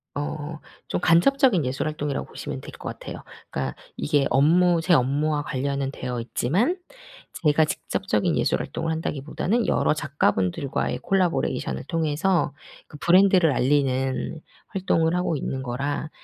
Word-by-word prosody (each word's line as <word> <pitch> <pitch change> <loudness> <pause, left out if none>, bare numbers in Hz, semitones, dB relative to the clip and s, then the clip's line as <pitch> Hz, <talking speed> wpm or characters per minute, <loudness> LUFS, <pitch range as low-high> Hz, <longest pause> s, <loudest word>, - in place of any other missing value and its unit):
어 150 +2 -4 0.3
좀 - - -2
간접적인 185 - +4
예술 135 +3 -2
활동이라고 150 -2 -3
보시면 - - -6
될 - - -9
것 - - -7
같아요. - - -8 0.3
그러니까 65 -1 -3 0.2
이게 145 -2 +1
업무 170 +4 +4
제 175 +1 +2
업무와 145 +2 +2
관련은 140 -1 -2
되어 125 -3 -4
있지만 185 - 0 0.7
제가 150 +1 +5
직접적인 - - -1
예술 - - +1
활동을 160 - -3
한다기보다는 160 - -1
여러 - - +2
작가분들과의 135 -5 0
콜라보레이션을 180 - 0
통해서 165 0 0 0.3
그 150 - -11
브랜드를 180 -2 +5
알리는 135 +2 0 0.3
활동을 175 -4 +1
하고 180 -3 0
있는 135 0 -3
거라 140 +5 -3
150 Hz, 345 characters per minute, -24 LUFS, 135-170 Hz, 0.7 s, 제가